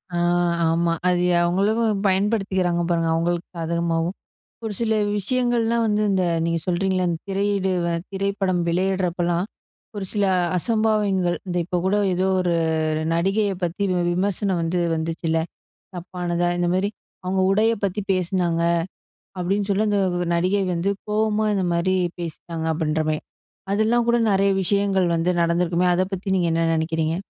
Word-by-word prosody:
ஆ - - 0 0.5
ஆமா. 170 +1 +1 0.2
அது 180 -1 +2 0.2
அவுங்களுக்கும் 205 +4 +1
பயன்படுத்திக்கிறாங்க, 190 -3 +1
பாருங்க. 165 -1 +1
அவுங்களுக்கு 170 +1 -1
சாதகமாவும். 170 +1 -1 0.5
ஒரு 220 - -3
சில 230 -1 0 0.3
விஷயங்கள்லாம் 235 +1 +1
வந்து 210 0 +1
இந்த 190 -1 +2 0.2
நீங்க 165 0 0
சொல்கிறீங்கல்ல. 185 +1 0
இந்த 165 -1 -2
திரையீடு 195 -1 0 0.2
அ - - 0 0.2
திரைப்படம் 195 -2 0
வெளையிடுறப்பல்லாம், 175 -1 0 0.5
ஒரு 200 - -3
சில 205 -2 +1 0.3
அசம்பாவிதங்கள் 210 -4 +1
இந்த 180 -1 -3
இப்ப 180 +1 -2
கூட 195 +2 +2 0.2
ஏதோ 185 +2 +1
ஒரு 175 -1 +1 0.6
நடிகைய 195 +4 +1
பத்தி 175 +3 -2
வி 180 - 0 0.2
விமர்சனம் 190 0 0
வந்து 175 +2 0
வந்துச்சுல்ல. 165 0 -1 0.6
தப்பானதா, 175 -1 -2
இந்தமாரி 185 +3 +1 0.3
அவுங்க 190 +1 0
உடைய 215 +3 +3
பத்தி 195 +2 -1
பேசினாங்க. 175 -2 0 0.8
அப்பிடின்னு 195 +3 -1
சொல்லி, 200 +2 +2
அந்த 205 -1 +2 0.4
நடிகை 185 +4 +1
வந்து 175 +3 0 0.2
கோவமா 215 0 +1
இந்தமாரி 185 -1 +1 0.2
பேசிட்டாங்க, 165 0 -5
அப்பிடின்றமாரி. 155 -1 -1 0.5
அதெல்லாம் 225 +3 +2
கூட 235 0 +4
நெறைய 195 0 +3
விஷயங்கள் 195 0 +1
வந்து 165 +2 +1
நடந்திருக்குமே! 170 +1 +1
அத 185 - +2
பத்தி 190 +1 -4
நீங்க 175 -2 +1
என்ன 165 0 +1
நினைக்கிறீங்க? 160 0 -1
185 Hz, 130 wpm, -23 LUFS, 170-200 Hz, 0.8 s, கூட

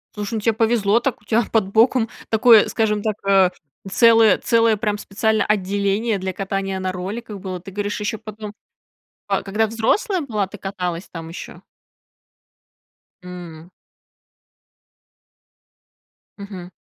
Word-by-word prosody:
Слушай, 210 +1 -4
ну - - -1
тебе 225 +2 +2
повезло 225 -1 +2
так, 250 -2 -2
у - - -25
тебя 225 +3 +2
под 215 -4 +1
боком 230 +1 +4 0.2
такое, 225 -1 +6
скажем 210 -2 0
так, 215 0 -1
э, 195 -2 +5 0.4
целое 225 -1 +5
целое 230 -1 +2
прям 210 0 -1
специальное 220 +2 0
отделение 200 +2 0
для 190 0 -3
катания 195 0 -3
на 185 0 -2
роликах 200 +4 -6
было. 185 -1 -5
Ты 195 +3 -11
говоришь, 205 +2 -3
еще 210 +1 -3
потом, 215 -1 -8 0.7
ка - - 0
когда 210 +3 0
взрослая 345 - 0
была, 215 -9 -2
ты 205 - -11
каталась 185 -2 -4
там 165 -1 -8
еще? 165 - -9 1.6
М. 175 -2 -10 2.7
Мгм. 190 -3 -9
205 Hz, 130 wpm, -21 LUFS, 190-225 Hz, 2.7 s, такое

